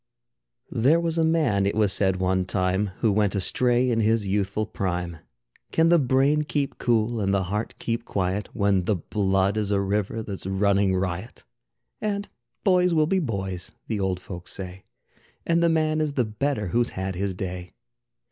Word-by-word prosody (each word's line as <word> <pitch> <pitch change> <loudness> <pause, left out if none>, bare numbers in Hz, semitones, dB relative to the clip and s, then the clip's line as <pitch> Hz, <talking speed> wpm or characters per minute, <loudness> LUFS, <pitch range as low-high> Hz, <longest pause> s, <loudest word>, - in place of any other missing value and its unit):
There 135 +7 +3
was 165 -1 0
a - - +3
man, 155 -12 +2
it 100 - -1
was 105 -3 +3
said 95 -2 +2
one 95 0 +1
time, 95 +2 0
Who 110 - +3
went 105 0 +1
astray 120 +6 +2
in 115 - +1
his 110 -1 +2
youthful 100 +2 0
prime. 90 -4 -3 0.5
Can 165 +1 +3
the 170 0 +6
brain 135 +3 +3
keep 145 -2 -2
cool 115 -1 +1
and 100 -1 +1
the 100 -1 +1
heart 105 +5 -3
keep 115 0 -2
quiet 95 -1 -2
When 100 -3 +1
the 105 - +2
blood 95 +2 0
is 105 -2 -1
a 100 -1 +2
river 105 +3 -1
that's 100 -3 -6
running 100 0 +2
riot? 95 +4 -3 0.6
And 205 -1 -2 0.4
boys 180 -3 +3
will 155 -1 +4
be 190 +4 +1
boys 95 - -3
the 110 -3 -2
old 95 -2 -1
folks 90 -1 -8
say, 95 -1 -7 0.6
And 170 0 +2
the 170 - +4
man 155 -1 +1
is 150 -2 -1
the 125 -4 +1
better 110 -1 -2
who's 120 +6 +2
had 95 0 -2
his 95 +1 -2
day. 90 -1 -6
105 Hz, 175 wpm, -25 LUFS, 95-130 Hz, 0.6 s, the